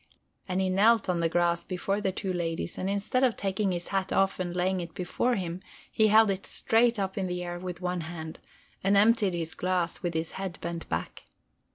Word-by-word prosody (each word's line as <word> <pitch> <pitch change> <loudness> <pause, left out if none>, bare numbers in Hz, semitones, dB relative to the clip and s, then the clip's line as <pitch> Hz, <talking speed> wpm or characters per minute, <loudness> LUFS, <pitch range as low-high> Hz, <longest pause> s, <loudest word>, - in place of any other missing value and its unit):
And 185 0 -1
he 190 -1 +1
knelt 215 +2 +4
on 175 -2 +1
the 165 -1 +1
grass 170 0 +1
before 195 +2 -2
the 190 - 0
two 190 0 -3
ladies, 165 -1 -3
and 190 - -1
instead 200 +6 0
of 250 -4 +3
taking 195 0 0
his 175 -1 -4
hat 195 -1 -1
off 195 0 +2
and 175 -1 -3
laying 185 +1 +1
it 170 -1 -8
before 235 +7 0
him 180 -1 -4 0.3
he 220 - +4
held 215 0 +6
it 195 0 -4
straight 230 +1 +2
up 195 -1 -2
in 190 - -1
the 180 0 -3
air 175 0 -5
with 180 -1 -6
one 180 -1 -1
hand, 160 -1 -7 0.4
and 200 +1 +4
emptied 210 -3 +4
his 165 -1 -3
glass 180 -2 -1
with 175 -2 -2
his 160 0 -1
head 190 -2 -5
bent 170 -1 -5
back. - - -4
185 Hz, 215 wpm, -28 LUFS, 175-200 Hz, 0.4 s, held